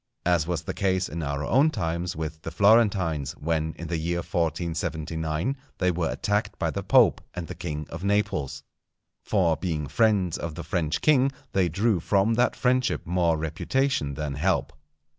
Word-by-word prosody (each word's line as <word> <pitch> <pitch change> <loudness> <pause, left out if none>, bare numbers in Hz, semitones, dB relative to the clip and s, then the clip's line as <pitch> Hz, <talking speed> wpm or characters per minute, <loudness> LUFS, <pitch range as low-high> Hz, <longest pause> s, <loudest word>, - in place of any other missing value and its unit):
As 85 -3 +2
was 85 -3 -2
the - - -4
case 95 -1 0
in 85 +2 -5
our 70 -1 -2
own 135 - +4
times 85 - -2
with 80 0 -5
the - - -5
Florentines, 95 -6 +3
when, 80 0 -2
in 85 - -6
the 85 -1 -2
year 85 +2 -1
1479, 80 - -2 0.2
they 90 -1 +2
were 85 -1 -1
attacked 105 +1 -1
by - - -1
the - - -3
Pope - - +4
and 90 -2 -4
the - - -7
King 75 -3 -5
of 85 +2 -6
Naples. 75 -9 0 0.6
For 90 -6 +2
being 80 -5 -2
friends 95 - +2
of 85 -2 -5
the - - -6
French 80 -1 -1
king 140 -3 +4 0.2
they 95 -3 +2
drew 100 +3 +1
from 100 +6 +2
that 120 +2 +2
friendship 130 0 +1
more 85 -1 +1
reputation 80 - -1
than 75 -1 -3
help. 85 +6 0
85 Hz, 170 wpm, -26 LUFS, 80-100 Hz, 0.6 s, own